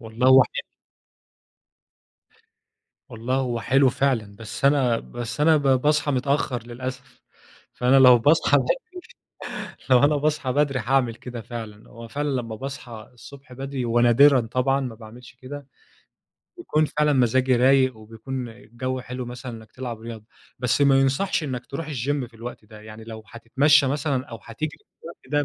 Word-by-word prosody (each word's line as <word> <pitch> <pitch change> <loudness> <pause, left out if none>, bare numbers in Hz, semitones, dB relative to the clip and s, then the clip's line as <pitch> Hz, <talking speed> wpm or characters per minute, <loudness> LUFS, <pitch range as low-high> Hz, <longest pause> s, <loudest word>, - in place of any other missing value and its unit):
والله 115 +2 -2
هو 130 0 +8
حلو. - - -5 2.5
والله 115 +3 -3
هو 125 -3 -1
حلو 135 +3 +3
فعلًا، 115 -7 -1
بس 110 +5 -5
أنا، 130 -5 +3
بس 120 +3 -6
أنا 160 0 +5
ب - - -3 0.2
باصحى 150 0 +1
متأخر 130 -2 -1
للأسف، 130 +1 -8 0.5
فأنا 125 +2 +2
لو 125 -2 +8
باصحى 150 +7 +4
بدري، - - -2 1.0
لو 125 -1 +6
أنا 150 +1 +4
باصحى 150 -2 -1
بدري 140 -2 +1
حاعمل 120 0 +1
كده 120 -1 -8
فعلًا، 110 -3 -9
هو 115 +1 -11
فعلًا 145 +4 -3
لمّا 115 -1 -7
باصحى 125 -4 -8
الصبح 135 +2 -14
بدري 135 -1 -4
ونادرًا 120 +4 +5
طبعًا 130 +4 0
ما 125 -4 -5
باعملش 120 +2 -13
كده، 135 +2 -10 0.9
بيكون 155 - 0
فعلًا 150 0 +1
مزاجي 130 0 +2
رايق، 130 -1 +3
وبيكون 115 +4 -7
الجو 125 +3 -6
حلو 125 0 -6
مثلًا 125 0 -7
إنك 110 -1 -12
تلعب 120 -3 -6
رياضة، 115 -2 -9 0.3
بس 125 +3 0
ما 135 -1 +5
يُنصحش 135 +6 0
إنك 130 -3 -5
تروح 150 +3 -6
الGym 140 0 -2
في 115 - -26
الوقت 115 -1 -9
ده 105 0 -14
يعني 110 +1 -11
لو 110 -1 -9
هتتمشى 135 +5 +2
مثلًا 135 -1 -1
أو 115 - -9
هتجري 150 +7 -4
في - - -38
الوقت 145 -3 -3
130 Hz, 155 wpm, -23 LUFS, 115-140 Hz, 2.5 s, هو